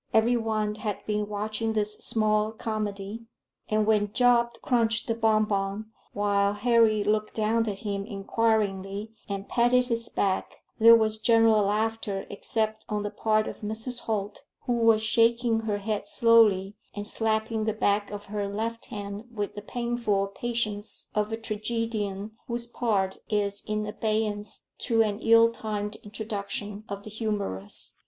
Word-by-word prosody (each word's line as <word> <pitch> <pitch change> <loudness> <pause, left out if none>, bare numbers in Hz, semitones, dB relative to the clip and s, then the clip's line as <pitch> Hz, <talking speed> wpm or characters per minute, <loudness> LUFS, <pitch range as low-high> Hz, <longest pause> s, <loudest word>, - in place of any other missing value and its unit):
Every 230 +2 +4
one 215 -2 0
had 210 -1 -4
been 210 -1 -1
watching 215 +2 -2
this 210 -1 -1
small 215 0 +1
comedy, 215 0 -4 0.4
and 215 0 +2
when 210 -1 +2
Job 240 -1 +4
crunched 230 -2 +1
the 230 - +1
bon 220 -1 +3
bon 200 +1 -2 0.2
while 200 0 +1
Harry 225 -1 +3
looked 215 +1 0
down 225 +1 +1
at 200 - -4
him 200 -1 -2
inquiringly 205 -1 -1 0.2
and 200 0 -4
patted 250 +1 +3
his 230 0 -1
back, 190 -1 -1 0.2
there 230 +1 +9
was 220 -1 +2
general 225 -1 +5
laughter 210 0 -1
except 215 +1 -2
on 210 -1 -1
the 205 - -3
part 215 0 +1
of - - -7
Mrs. 220 +4 -3
Holt, 210 +1 -3 0.2
who 245 - +1
was 225 -2 +4
shaking 230 +1 +3
her 215 -2 -1
head 205 0 -3
slowly, 210 -4 +4 0.2
and 205 0 -5
slapping 220 0 0
the 220 - +2
back 205 -1 +1
of 205 0 -7
her 205 0 -3
left 225 +3 -3
hand 205 +1 -6
with 205 -3 -3
the 205 - -7
painful 230 -3 -1
patience 220 -3 -3
of 210 0 0
a 225 - -1
tragedian 215 -2 -3 0.2
whose 235 -1 -2
part 210 -5 -1
is 205 -1 -1
in 215 0 -1
abeyance 210 -1 -2 0.2
to 225 -2 +3
an 210 -1 -2
ill 230 0 +6
timed 210 -2 -4
introduction 210 -1 -5
of 200 0 -5
the 215 - -9
humorous. 200 - -4
215 Hz, 150 wpm, -27 LUFS, 205-225 Hz, 0.4 s, there